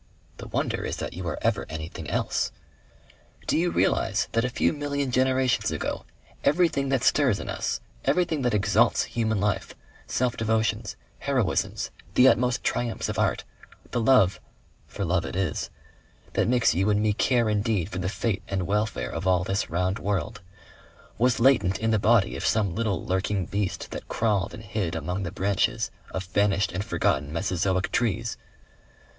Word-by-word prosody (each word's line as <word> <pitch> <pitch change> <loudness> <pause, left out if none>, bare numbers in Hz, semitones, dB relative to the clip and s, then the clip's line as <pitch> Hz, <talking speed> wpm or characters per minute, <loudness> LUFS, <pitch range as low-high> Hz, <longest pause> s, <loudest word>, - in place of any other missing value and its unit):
The - - -8
wonder - - -1
is - - -3
that - - -4
you 90 0 -5
are 80 - -2
ever - - +1
anything 80 +1 -6
else.... - - 0 0.9
Do - - +1
you 175 +2 +2
realize - - +1
that 115 - +1
a 125 - 0
few 125 - +1
million 145 -2 -2
generations 130 0 +2
ago, - - -3 0.4
everything 150 -4 +2
that 135 -3 +1
stirs 135 -8 +3
in - - -6
us, - - -2 0.2
everything 160 +1 +1
that 125 -4 +1
exalts 105 +3 +3
human 110 -3 -1
life, 105 0 -1 0.3
self 125 -2 0
devotions, 110 -1 0 0.2
heroisms, - - 0 0.2
the 125 - +7
utmost 125 -1 +3
triumphs 120 -2 -1
of - - -2
art, - - +1 0.5
the 120 - 0
love 110 -6 +4 0.5
for 100 - -4
love 90 0 +1
it - - -6
is 95 -5 -1 0.6
that - - +2
makes 120 -1 +3
you 95 +5 +1
and 105 -1 +3
me 105 0 +2
care 120 +2 +2
indeed 105 -4 0
for 95 -2 -5
the 90 +1 -1
fate 105 -1 -1
and 95 -2 -2
welfare 105 +3 -1
of 85 +4 -3
all 90 -1 +3
this 95 +2 -1
round 90 +4 0
world, 100 -2 -2 0.8
was 125 0 +3
latent 115 -7 +4
in 115 0 0
the 110 - +3
body 105 -2 +3
of - - -5
some 105 -5 +1
little 105 -3 -1
lurking 95 +1 0
beast 100 +1 -3
that - - -7
crawled 105 -4 0
and 110 - -10
hid 95 -5 -2
among 90 +4 -3
the 85 - -3
branches 100 0 0 0.2
of 95 - -4
vanished 100 +2 +1
and 90 +3 -2
forgotten 75 -9 0
Mesozoic 90 +2 0
trees? 115 -1 0
105 Hz, 170 wpm, -26 LUFS, 95-120 Hz, 0.9 s, the